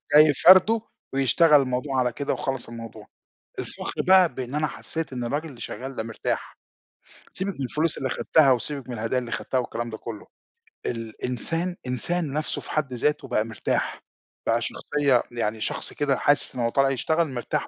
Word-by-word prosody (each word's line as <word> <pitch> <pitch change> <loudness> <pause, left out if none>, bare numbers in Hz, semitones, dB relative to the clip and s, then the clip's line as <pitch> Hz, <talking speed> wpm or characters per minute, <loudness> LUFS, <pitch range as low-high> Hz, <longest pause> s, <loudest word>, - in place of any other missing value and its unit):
جاي 150 0 +8
فارده 190 - +7 0.3
ويشتغل 140 +3 +5
الموضوع 130 +1 -1
على 125 -1 +2
كده 140 +3 -2
وخلّص 135 -3 -3
الموضوع. 115 -2 -9 0.5
الفخر - - -4
بقى 185 -2 +6
بإن 130 +1 -5
أنا 150 +1 +1
حسّيت 160 +1 -4
إن 125 -1 -3
الراجل 145 +7 -2
اللي 130 -6 -12
شغّال 135 +1 -6
ده - - -1
مرتاح. 115 0 -4 0.7
سيبِك 195 +1 -2
من - - -1
الفلوس 155 +5 0
اللي 130 - -2
خدتها 145 +2 +4
وسيبِك 130 +1 -2
من - - -4
الهدايا 115 +3 0
اللي 120 -2 -7
خدتها 130 - -2
والكلام 120 -1 -2
ده 110 - -6
كُلّه، 110 -2 -8 0.6
الإنسان 125 +9 -2
إنسان 145 +5 -1
نَفْسه 155 +1 -2
في - - -9
حد 150 -4 -1
ذاته 150 +5 0
بقى 110 - +1
مرتاح، 110 -2 -2 0.4
بقى 115 +1 +2
شخصية 140 +1 +1
يعني 110 -2 -2
شخص - - -3
كده 140 -3 +1
حاسِس 145 0 +2
إن 125 - -2
هو 115 - +2
طالع 135 +3 +3
يشتغل 160 +5 +1
مرتاح 130 -4 -3
135 Hz, 175 wpm, -25 LUFS, 120-150 Hz, 0.7 s, جاي